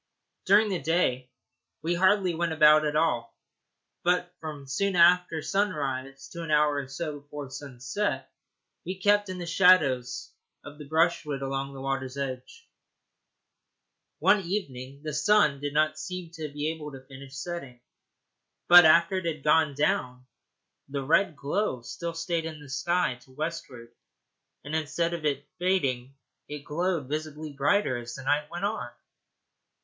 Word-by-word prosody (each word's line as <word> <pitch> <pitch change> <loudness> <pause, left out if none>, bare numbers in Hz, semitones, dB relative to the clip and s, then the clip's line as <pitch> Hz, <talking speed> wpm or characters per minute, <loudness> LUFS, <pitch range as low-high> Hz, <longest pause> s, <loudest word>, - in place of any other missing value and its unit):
During 210 +2 +5
the 185 -3 -2
day 135 -5 0 0.5
we 170 +2 0
hardly 185 0 +3
went 165 0 -1
about 155 0 +6
at 150 - -2
all, 120 -8 0 0.7
but 180 0 +1
from 150 -3 -7
soon 190 +8 -1
after 175 -2 +4
sunrise 135 -9 -2
to 170 - -7
an 165 - -6
hour 150 -1 +3
or 140 -2 -3
so 145 +2 -5
before 145 -1 -9
sunset 135 +9 -3 0.6
we 185 +1 -5
kept 205 +1 +3
in 185 - -5
the 175 - -5
shadow 170 -7 +5 0.6
of 145 +1 -11
the 150 - -9
brushwood 160 -3 +1
along 135 0 -3
the 135 - -8
water's 135 0 -3
edge. 135 - -6 1.5
One 210 - +4
evening 140 -8 -5
the 155 -1 -4
sun 150 -2 +3
did 145 0 -3
not 155 +1 +1
seem 180 -3 -6
to 160 -2 -6
be 150 +2 -2
able 155 -2 -7
to 130 0 -11
finish 135 0 -12
setting, 140 -5 -6 0.9
but 175 -1 +10
after 170 +4 +5
it 185 - -3
had 155 -4 -3
gone 150 -2 +3
down 125 -3 -1 0.6
the 140 0 -3
red 160 +4 +2
glow 140 - -2
still 170 +6 -5
stayed 165 0 -2
in 160 -2 -6
the 145 -2 -13
sky 145 -2 0
to 130 - -21
westward, 130 -6 -6 0.7
and 145 +2 -4
instead 165 +2 -1
of 170 -2 -4 0.4
fading 135 -9 0 0.3
it 145 -1 -7
glowed 170 -2 -1
visibly 155 0 -5
brighter 140 -1 +1
as 120 0 -8
the 135 - -8
night 150 +2 0
went 175 +3 -3
on. 165 - -3
155 Hz, 150 wpm, -27 LUFS, 135-175 Hz, 1.5 s, but